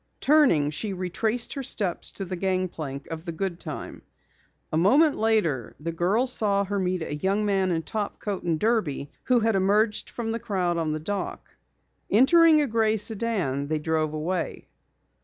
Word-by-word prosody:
Turning, 250 - +4
she 195 +7 -3
retraced 215 +6 -2
her 275 - -4
steps 200 -8 -1
to 195 - -5
the 185 0 -4
gangplank 175 -7 -3
of 160 0 -5
the 170 - -4
Goodtime. 175 +1 -5 0.7
A - - +2
moment 280 - +4
later 190 - 0
the 165 +3 -3
girls 205 +10 +1
saw 200 -2 +2
her 200 +1 -2
meet 180 -2 -1
a 155 - -5
young 195 +7 0
man 195 -2 +1
in 165 -2 -1
topcoat 205 -1 -4
and 165 -2 -1
derby 180 - 0
who 250 -2 +3
had 225 -1 +2
emerged 210 +3 +2
from 225 -2 -4
the 230 - -2
crowd 180 -5 -1
on 160 -2 -1
the 155 - -2
dock. 195 +5 -5 0.5
Entering 310 +7 +6
a - - +2
gray 220 -3 +1
sedan, 200 - -1
they 155 +1 0
drove 155 0 -1
away. 170 +4 -3
195 Hz, 165 wpm, -26 LUFS, 165-220 Hz, 0.7 s, Entering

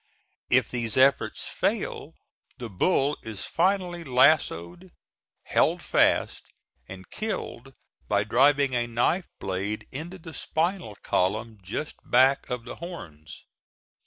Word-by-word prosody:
If - - +4
these 115 -2 -2
efforts 135 +1 +3
fail - - -2 0.4
the 120 -3 -7
bull 140 - +1
is 110 -4 -7
finally 180 -1 0
lassoed, 130 - +2 0.5
held - - +1
fast - - +2 0.4
and 95 0 -10
killed 135 - -5 0.3
by 100 -1 +2
driving 140 +4 +3
a 120 -1 0
knife 120 +10 0
blade 95 +3 -3
into 165 +7 -6
the 160 -2 -11
spinal 165 - -2
column 110 +4 -1
just 105 +11 -5
back 130 +3 +3
of 125 -2 -4
the 125 - -8
horns. 85 - -9
125 Hz, 115 wpm, -26 LUFS, 105-160 Hz, 0.5 s, If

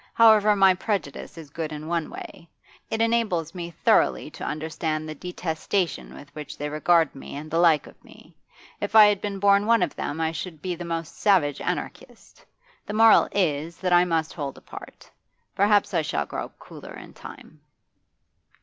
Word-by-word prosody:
However, 215 -2 +6
my 195 -1 +5
prejudice 180 -6 -4
is 155 -3 -11
good 160 0 -5
in 150 0 -7
one 165 -1 -2
way; 165 - -11 0.4
it 220 - -2
enables 215 -9 0
me 175 -2 -6
thoroughly 170 - +1
to - - -10
understand 155 0 -3
the 155 - -5
detestation 175 +2 -3
with 145 - -13
which 150 -2 -8
they 150 +1 -4
regard 165 +2 +2
me 135 - -10
and 150 +2 -8
the 165 - +1
like 165 -4 +4
of - - -17
me. - - -18 0.4
If 220 - -4
I 215 -1 +10
had 205 -1 +2
been 205 -1 -4
born 200 +1 +3
one 230 -4 +4
of - - -3
them 145 - -4
I 160 0 0
should 165 0 -7
be 180 +4 -3
the 175 0 -7
most 165 -2 -5
savage 175 -9 +2
anarchist. - - -6 0.4
The 210 - -5
moral 225 0 +6
is, 165 -3 -1
that 180 -1 -1
I 175 0 +6
must 165 -2 -1
hold 140 -4 -5
apart. - - -12 0.5
Perhaps 205 0 +2
I 170 - +2
shall 75 - -2
grow - - -5
cooler - - -12
in - - -12
time. - - -13
170 Hz, 180 wpm, -24 LUFS, 155-200 Hz, 0.5 s, I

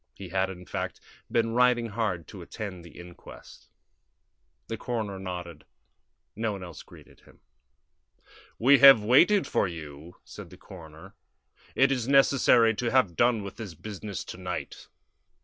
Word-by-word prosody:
He 95 -2 -10
had, 95 +1 -1
in 90 -1 -10
fact, - - -5 0.3
been 115 -1 +1
riding 120 -1 +2
hard 100 -7 -3
to - - -10
attend 95 -5 -8
the 85 - -15
inquest. 85 0 -14 1.0
The 115 - -5
coroner 110 -5 -4
nodded; 90 -4 -7 0.7
no 110 0 -2
one 95 -2 -8
else 90 - -10
greeted - - -18
him. - - -22 1.2
"We 135 +4 +5
have 135 -6 +8
waited 170 - +4
for - - 0
you," 80 -1 -10
said - - -11
the - - -15
coroner. 80 -4 -13 0.6
"It 135 +1 +3
is 125 -3 -2
necessary 135 -4 +4
to 120 - -1
have 115 -9 +2
done 120 -1 +2
with 100 -1 -9
this 100 -7 -8
business 100 +1 -7
to - - -10
night." 90 -6 -7
105 Hz, 150 wpm, -27 LUFS, 90-120 Hz, 1.2 s, have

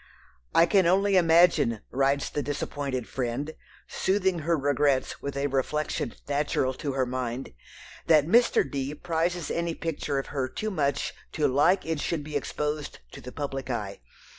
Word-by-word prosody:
"I 165 - +7
can 190 -2 +3
only 195 +2 +3
imagine," 165 - +4
writes 135 +1 +1
the 145 - -1
disappointed 140 -2 -3
"friend," 135 +4 -3 0.3
soothing 190 -2 0
her 165 +2 +1
regrets 140 -1 +1
with 140 0 -4
a 140 - 0
reflection 140 -2 -1
natural 140 -2 0
to 140 +1 -4
her 130 -1 +1
mind, 125 - -4 0.5
"that 155 -3 +5
Mr. 235 - +4
D. 140 +1 -3
prizes 170 0 -1
any 170 -1 -1
picture 150 -3 -3
of 135 - -1
her 135 -3 0
too 215 +9 -3
much 140 -6 -1 0.2
to 150 -2 +2
like 145 +8 +3
it 160 -2 -2
should 155 0 -2
be 150 0 -7
exposed 150 +1 -3
to - - -10
the 125 - -8
public 135 -2 -4
eye. 105 - -4
145 Hz, 160 wpm, -27 LUFS, 135-165 Hz, 0.5 s, I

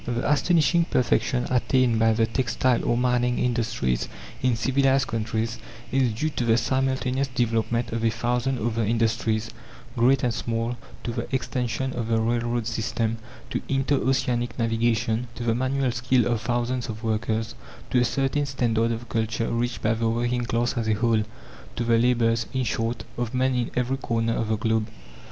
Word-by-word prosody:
The 120 0 -1
astonishing 170 +2 +3
perfection 125 -2 +1
attained 125 -2 +2
by 115 0 +4
the 115 0 +2
textile 125 +1 +1
or 120 - +1
mining 125 0 +1
industries 115 - 0 0.3
in 130 -2 +2
civilized 135 +3 +2
countries 115 0 -2 0.3
is 130 -3 +2
due 155 +8 -1
to 125 - -2
the 115 -1 +3
simultaneous 130 +1 0
development 120 -1 0
of 115 0 -2
a 115 - +4
thousand 125 +3 -1
other 115 0 -1
industries, 115 0 0 0.4
great 130 +4 +3
and 120 -2 +1
small, 115 +2 -2 0.3
to 120 - -2
the - - -4
extension 130 0 -2
of 120 -2 -3
the 115 -1 +2
railroad 120 0 0
system, 115 0 -1 0.3
to - - -1
inter 135 +1 +2
oceanic 125 -3 0
navigation, 115 0 0
to 120 - -5
the 115 -1 +2
manual 130 +2 0
skill 125 +1 +2
of 120 -2 0
thousands 120 +1 -1
of 110 +1 -6
workers, 110 0 -1 0.4
to 125 - +4
a - - +4
certain 135 +4 0
standard 115 -4 +1
of 115 +1 -4
culture 115 +1 -1
reached 120 0 -2
by 110 - +3
the 115 0 0
working 120 +1 0
class 120 +1 0
as 115 -2 -1
a 110 - +3
whole 110 0 +2 0.5
to 120 - -1
the 115 -1 +3
labours, 115 -1 +2
in 130 - +1
short, 115 0 -2 0.2
of 120 +1 -2
men 130 +1 +2
in 125 -2 0
every 125 +2 0
corner 115 -3 0
of 115 - -1
the 110 0 0
globe. 110 0 0
120 Hz, 175 wpm, -25 LUFS, 115-125 Hz, 0.5 s, by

